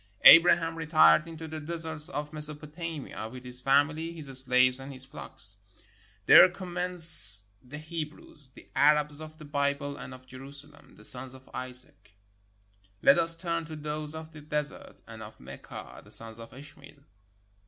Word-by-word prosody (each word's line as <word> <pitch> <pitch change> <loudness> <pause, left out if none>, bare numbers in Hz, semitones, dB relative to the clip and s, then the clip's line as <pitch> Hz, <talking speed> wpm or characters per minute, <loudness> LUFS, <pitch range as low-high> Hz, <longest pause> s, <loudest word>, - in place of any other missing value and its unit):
Abraham 165 -1 +6
retired 155 0 +3
into 160 -1 -10
the 155 0 -8
deserts 160 -1 -2
of 150 +1 -7
Mesopotamia 150 -4 -3
with 125 +1 -12
his 125 0 +5
family, 150 +5 0
his 160 -3 -11
slaves, 125 0 +4
and 135 +1 -10
his 130 -1 -5
flocks. - - -3 0.7
There - - +7
commence 175 - +5 0.2
the 130 +4 -12
Hebrews 155 -3 -6
— 130 - -28
the - - -17
Arabs 150 +1 +1
of 155 0 -12
the 155 - -13
Bible 140 0 -3
and - - -11
of 130 0 -14
Jerusalem, 140 +3 -12
the 105 - -19
sons 130 +2 -1
of 130 0 -18
Isaac. 125 -6 -8 0.9
Let - - +4
us 165 0 +1
turn 170 -1 -4
to 160 0 -10
those 150 0 -6
of 160 0 -10
the 155 - -13
desert 150 0 -6
and 110 -1 -12
of 110 0 -13
Mecca, 70 +2 -12
the - - -19
sons 115 0 +3
of 115 - -13
Ishmael. 140 +1 -16
150 Hz, 160 wpm, -26 LUFS, 130-160 Hz, 0.9 s, There